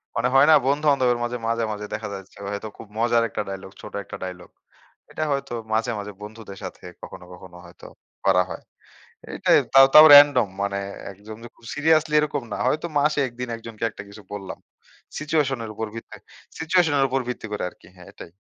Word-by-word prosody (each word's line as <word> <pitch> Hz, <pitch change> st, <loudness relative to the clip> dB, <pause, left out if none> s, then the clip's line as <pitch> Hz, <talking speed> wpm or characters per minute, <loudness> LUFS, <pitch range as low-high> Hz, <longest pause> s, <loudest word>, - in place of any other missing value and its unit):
মানে 115 Hz, +2 st, +1 dB
হয় 135 Hz, -, +7 dB
না? -, -, +8 dB
বন্ধু-বান্ধবের 140 Hz, -3 st, +2 dB
মাঝে; 120 Hz, +1 st, -3 dB
মাঝে, 115 Hz, 0 st, 0 dB
মাঝে 105 Hz, 0 st, -5 dB
দেখা 105 Hz, 0 st, -4 dB
যাচ্ছে 95 Hz, -1 st, -11 dB
হয়তো 100 Hz, +2 st, -5 dB
খুব 110 Hz, -, -11 dB
মজার 115 Hz, +1 st, +2 dB
একটা -, -, -3 dB
ডায়ালগ, 95 Hz, 0 st, -7 dB
ছোট -, -, -11 dB
একটা -, -, -9 dB
ডায়ালগ। 90 Hz, -1 st, -8 dB, 0.6 s
এটা 155 Hz, -, -3 dB
হয়তো 140 Hz, -3 st, -3 dB, 0.2 s
মাঝে, 115 Hz, +2 st, 0 dB
মাঝে 105 Hz, 0 st, -7 dB
বন্ধুদের 105 Hz, -1 st, -10 dB
সাথে 95 Hz, -, -9 dB, 0.2 s
কখনো, 90 Hz, -, -10 dB
কখনো 90 Hz, 0 st, -13 dB
হয়তো 85 Hz, -, -16 dB, 0.4 s
করা 90 Hz, -1 st, +4 dB
হয়। -, -, -8 dB, 0.7 s
এইটাই -, -, +3 dB, 0.2 s
তাও, 135 Hz, 0 st, +9 dB
তাও 155 Hz, +1 st, +11 dB
রান্ডম। 145 Hz, -6 st, +7 dB
মানে 100 Hz, 0 st, -1 dB, 0.3 s
১ 95 Hz, -, -16 dB
জন, 110 Hz, -, -7 dB
যে -, -, -10 dB
খুব 115 Hz, -, -21 dB
সিরিয়াসলি 155 Hz, +1 st, +2 dB
এরকম 150 Hz, -2 st, -2 dB
না। -, -, -3 dB
হয়তো 155 Hz, +5 st, 0 dB
মাসে 150 Hz, +1 st, +1 dB
১ 120 Hz, -, -12 dB
দিন 125 Hz, -, -3 dB
একজনকে 115 Hz, -1 st, -9 dB
একটা 100 Hz, -, -10 dB
কিছু 105 Hz, +1 st, -12 dB
বললাম। 100 Hz, -2 st, -7 dB, 0.6 s
সিচুয়েশন 150 Hz, -4 st, 0 dB
এর 110 Hz, -, -7 dB
উপর 110 Hz, 0 st, -4 dB
ভিত্তি 115 Hz, -, -9 dB, 0.4 s
সিচুয়েশন 160 Hz, -1 st, +2 dB
এর 135 Hz, -, +4 dB
উপর 135 Hz, +1 st, 0 dB
ভিত্তি 125 Hz, -, -5 dB
করে 105 Hz, -, -3 dB
আরকি -, -, -21 dB
হ্যাঁ, 90 Hz, -1 st, -15 dB
এটাই। 85 Hz, -, -12 dB
115 Hz, 195 wpm, -23 LUFS, 100-140 Hz, 0.7 s, তাও